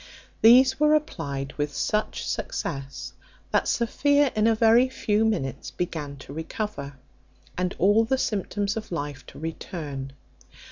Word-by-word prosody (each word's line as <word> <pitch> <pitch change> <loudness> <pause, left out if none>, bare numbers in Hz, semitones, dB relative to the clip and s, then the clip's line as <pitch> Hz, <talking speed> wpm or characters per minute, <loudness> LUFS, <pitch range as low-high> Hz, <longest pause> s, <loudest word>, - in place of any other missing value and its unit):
These 255 +4 +7
were 300 0 +5
applied 140 - -3
with 145 0 0
such 215 0 -1
success, 140 - -4 0.4
that - - +2
Sophia 285 +4 +2
in 215 +1 +3
a 225 - +4
very 230 +3 +5
few 215 -4 0
minutes 185 -13 -1
began 150 -5 -4
to 135 0 -11
recover, 160 -2 -5 0.6
and 180 0 -1
all 205 +4 +4
the 265 +4 +1
symptoms 205 -2 -1
of 220 -2 -6
life 145 -5 -4
to - - -12
return. 150 -4 -6
205 Hz, 135 wpm, -26 LUFS, 145-225 Hz, 0.6 s, These